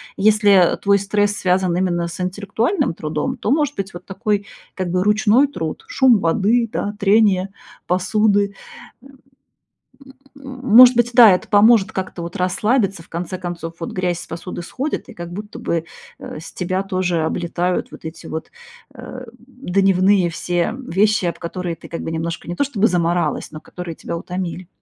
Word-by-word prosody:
если, 210 0 +4 0.2
э, - - -3
твой 200 0 +2
стресс 205 +1 +1
связан 185 -2 +1
именно 175 -2 0
с 170 - -8
интеллектуальным 210 - -1
трудом, 150 -2 -3
то, 215 - -2
может 290 0 +1
быть, 195 -1 -5
вот 175 +1 -10
такой, 205 +1 -2 0.3
как 185 -2 -3
бы, 180 +1 0
ручной 220 +6 +4
труд: 160 - -5
шум 260 -5 +4
воды, 215 +7 +1
да, 205 +1 -3
трение 200 -2 +3 0.4
посуды. 200 +2 +1 1.8
М, 270 -2 -10 0.2
может 250 +1 +10
быть 240 0 +2
да, 230 -4 +9
это 180 - -2
поможет 210 -1 +5
как-то 185 -2 -5
вот 170 - -7
расслабиться, 195 +1 0
в - - -24
конце 180 +2 -4
концов 170 -2 -6
вот - - -4
грязь 180 -2 -2
с - - -11
посуды 170 +1 -6
сходит, 270 - -4
и - - -10
как 175 -3 -8
будто 210 +3 -8
бы, 165 -1 -1 0.4
э, - - -8
с 165 - -11
тебя 185 +2 -2
тоже 185 -4 -1
облетают 175 +2 -2
вот - - -13
эти 160 +1 -8
вот, 160 - -6 0.5
э, 255 0 -9
дневные 195 -6 +1
все 175 +4 -1
вещи, 205 +2 +2
об 170 - -2
которые 175 0 -4
ты 165 - -14
как 165 - -5
бы 160 - -4
немножко 165 +1 -4
не 175 - -4
то - - +1
чтобы 225 -6 +1
замаралась, 170 -3 0
но 155 - -8
которые 180 -2 -8
тебя - - -6
утомили. 180 0 -5
190 Hz, 170 wpm, -20 LUFS, 175-215 Hz, 1.8 s, может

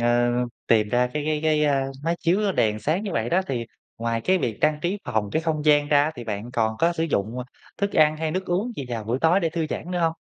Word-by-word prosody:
ơ, 120 +1 +3 0.4
tìm 110 -2 +3
ra 125 +3 +2
cái 150 - -1
cái 155 -1 0
cái, 155 -1 +2
a, 140 -2 +2 0.2
máy 170 +1 +1
chiếu 195 +4 +2
đèn 110 -9 +1
sáng 160 - 0
như 200 - -3
vậy 115 +1 -1
đó, 180 - +3
thì 120 -3 -3 0.3
ngoài 115 0 -1
cái 185 +9 +2
việc 115 - -2
trang 150 0 +2
trí 185 +4 -1
phòng 110 -4 -1
cái 160 - 0
không 155 -2 -1
gian 145 -1 +4
ra 145 -1 +5
á 155 - 0
thì 120 -4 -8
bạn 110 +2 -4
còn 110 -2 0
có 170 +1 +3
sử 165 - -2
dụng, 115 -6 -1
ờ, 125 - -4 0.3
thức 200 0 -1
ăn 155 -1 +4
hay 160 0 -2
nước 185 +4 -2
uống 195 +8 -1
gì 140 - -4
vào 115 -3 -4
buổi 115 +4 -1
tối 165 +5 +4
để 165 -3 0
thư 165 -1 -2
giãn 175 - -4
nữa 180 - -1
hông? 165 -1 +2
150 Hz, 275 wpm, -24 LUFS, 120-170 Hz, 0.4 s, ra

